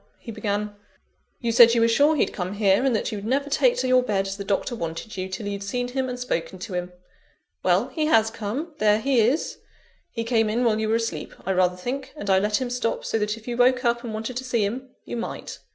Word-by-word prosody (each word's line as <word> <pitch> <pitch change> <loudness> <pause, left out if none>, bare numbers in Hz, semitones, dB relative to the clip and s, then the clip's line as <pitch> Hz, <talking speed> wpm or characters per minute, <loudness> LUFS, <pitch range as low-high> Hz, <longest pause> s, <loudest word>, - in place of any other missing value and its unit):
he 230 - -9
began, 205 -1 -2 0.7
"you 235 -2 0
said 235 0 +7
you 230 - +3
were 230 - +5
sure 285 +7 +4
he'd 290 - +1
come 185 0 -3
here, 200 +1 +3
and 265 -3 +2
that 215 - -1
you'd 205 -2 -5
never 275 +5 -1
take - - +3
to 260 - 0
your 255 0 +5
bed, 205 -5 0
as 195 0 -4
the 200 - -6
Doctor 200 +5 -1
wanted 170 +3 -5
you, 185 0 -4
till 195 +3 -5
you'd 200 -1 -4
seen 245 +5 -2
him 260 0 -2
and 250 0 -5
spoken 190 -7 -3
to 190 +2 -7
him. 180 0 -3 0.7
Well, - - +2
he 310 -2 -1
has 225 -7 +4
come; 250 +11 -4
there 210 0 +4
he 265 +1 +2
is. 250 +8 +1 0.5
He 230 - -4
came 225 -2 +2
in 235 +3 0
while 220 -2 +2
you 220 0 -1
were 225 - +3
asleep, 225 -10 -3
I 190 - 0
rather 180 -1 +2
think; 260 +8 -5
and 205 -9 -2
I 190 - +5
let 210 +2 +1
him 255 -2 -3
stop, 245 -2 -2
so 225 - 0
that 210 +1 -1
if 225 - -15
you 240 - -2
woke 250 +1 +3
up 235 0 +1
and 235 - -5
wanted 220 +3 -4
to 260 - -3
see 235 -5 +1
him, 255 +6 -4 0.2
you - - -5
might. 235 - -6
225 Hz, 250 wpm, -24 LUFS, 205-250 Hz, 0.7 s, said